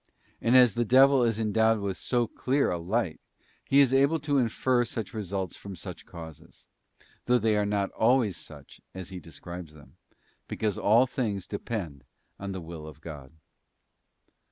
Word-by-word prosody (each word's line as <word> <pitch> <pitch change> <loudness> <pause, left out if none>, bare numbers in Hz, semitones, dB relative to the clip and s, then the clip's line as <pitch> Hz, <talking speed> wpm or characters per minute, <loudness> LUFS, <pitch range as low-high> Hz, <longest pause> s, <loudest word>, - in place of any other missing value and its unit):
And 120 +3 +5
as 125 -4 +6
the 120 - +1
devil 135 +3 +6
is 115 -2 +1
endowed 110 +1 +2
with 100 -2 -3
so 120 +3 0
clear 135 +5 0
a 90 - -2
light, 95 0 -1 0.4
he 140 - +3
is 135 -2 +3
able 140 +4 +4
to 145 -1 +1
infer 125 +1 +1
such 115 -1 -5
results 100 -4 -4
from 100 -1 -9
such 90 +1 -8
causes; 80 -3 -12 0.6
though 125 0 +4
they 110 -2 +2
are 105 -1 +1
not 100 -1 0
always 115 -4 +2
such 75 -3 -12
as 95 -2 -7
he 95 -1 -7
describes 85 0 -10
them, 75 -1 -17 0.5
because 105 -3 -1
all 115 +5 +5
things 110 -7 -3
depend 100 -9 -5 0.4
on 100 0 -5
the 95 -1 -5
will 80 -2 -8
of 75 -1 -11
God. 75 -5 -9
105 Hz, 165 wpm, -28 LUFS, 90-120 Hz, 0.6 s, as